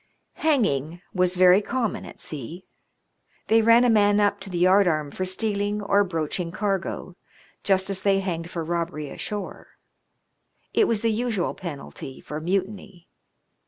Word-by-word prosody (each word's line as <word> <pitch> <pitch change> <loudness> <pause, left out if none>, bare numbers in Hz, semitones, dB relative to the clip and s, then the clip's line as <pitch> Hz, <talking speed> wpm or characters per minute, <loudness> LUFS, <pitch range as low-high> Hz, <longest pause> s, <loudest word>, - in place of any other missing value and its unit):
Hanging 175 - +1
was 180 -1 +1
very 185 +2 +6
common 235 0 -2
at - - -13
sea. 155 +5 -8 0.8
They 225 +1 +5
ran 230 +2 +6
a 245 - +4
man 205 -1 +4
up 205 0 +2
to 195 0 -8
the 180 - -4
yardarm 175 -5 +3
for 185 - -3
stealing 205 +1 -1
or 205 0 +3
broaching 170 -1 -3
cargo 195 -2 -3 0.5
just 190 -1 +2
as 195 -1 -2
they 195 -1 +3
hanged 170 -3 -3
for 170 -2 -4
robbery 165 -3 -3
ashore. 210 -1 -6 1.0
It 435 - +4
was 220 -3 0
the 230 - +3
usual 220 -4 -1
penalty 140 -5 -8
for 150 +1 -6
mutiny. 190 0 -3
190 Hz, 145 wpm, -24 LUFS, 170-205 Hz, 1.0 s, very